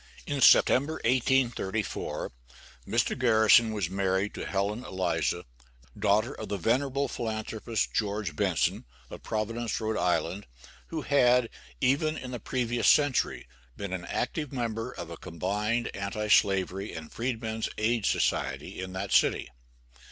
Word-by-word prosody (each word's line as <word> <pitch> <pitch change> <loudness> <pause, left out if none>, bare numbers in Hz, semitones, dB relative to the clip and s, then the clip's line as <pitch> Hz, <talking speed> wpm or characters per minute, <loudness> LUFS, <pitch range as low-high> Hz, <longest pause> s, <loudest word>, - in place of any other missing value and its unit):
In 145 -1 -2
September, 140 +5 +6
1834, 120 -4 0 0.6
Mr. - - +1
Garrison 110 -1 +5
was 105 -5 -1
married 95 +2 0
to - - -5
Helen 100 +4 -1
Eliza, 95 -2 -1 0.5
daughter 110 +6 +2
of - - -7
the 100 - -1
venerable 135 +7 +1
philanthropist, 110 -2 -3
George 105 -3 -1
Benson, 95 -6 0 0.3
of - - -8
Providence, 115 +1 -2
R.I., 100 -4 0 0.5
who 160 -3 -4
had, 125 -4 +4 0.3
even 155 +4 +2
in 125 -2 -7
the 120 - -4
previous 120 -1 -1
century, 145 - +2 0.3
been 100 -2 -5
an 90 -2 -4
active 150 - -3
member 115 -4 -3
of - - -8
a - - -7
combined 105 +7 -2
anti 100 +2 -3
slavery 95 0 +2
and 80 -2 -8
freedmen's 115 -2 -3
aid 110 0 +1
society - - -1
in 95 0 -6
that 95 +1 -4
city. - - +3
110 Hz, 130 wpm, -28 LUFS, 100-125 Hz, 0.6 s, September